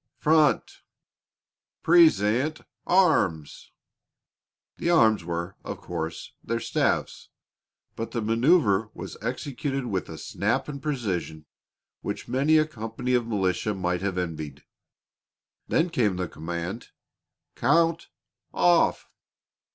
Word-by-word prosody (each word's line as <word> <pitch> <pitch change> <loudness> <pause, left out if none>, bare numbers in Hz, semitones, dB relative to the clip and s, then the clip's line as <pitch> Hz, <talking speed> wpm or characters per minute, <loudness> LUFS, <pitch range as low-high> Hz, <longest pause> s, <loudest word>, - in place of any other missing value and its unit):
Front! 155 -1 +2 1.0
Present 155 - +4 0.3
arms!" 145 - +2 1.1
The 170 - -1
"arms" 110 - +4
were, 85 +2 -4
of - - -5
course, 80 +1 -5
their 115 +1 -2
staves, - - -1 0.7
but 115 - -4
the 115 - -3
manoeuver 115 - +3
was - - -7
executed 135 -1 -3
with 95 -6 -3
a 80 - -7
snap - - -1
and 140 -2 -6
precision 95 - -3 0.6
which - - -5
many 145 +5 +3
a 155 - +4
company 120 -2 -4
of 120 -2 +1
militia 100 -1 0
might 90 -1 -1
have 95 -2 -2
envied. 80 -5 -5 1.0
Then 165 +2 +1
came 105 - +1
the 90 0 -2
command, 85 +7 -5 0.7
"Count 165 +2 +2 0.5
off!" 175 -1 +3
115 Hz, 105 wpm, -26 LUFS, 90-150 Hz, 1.1 s, Present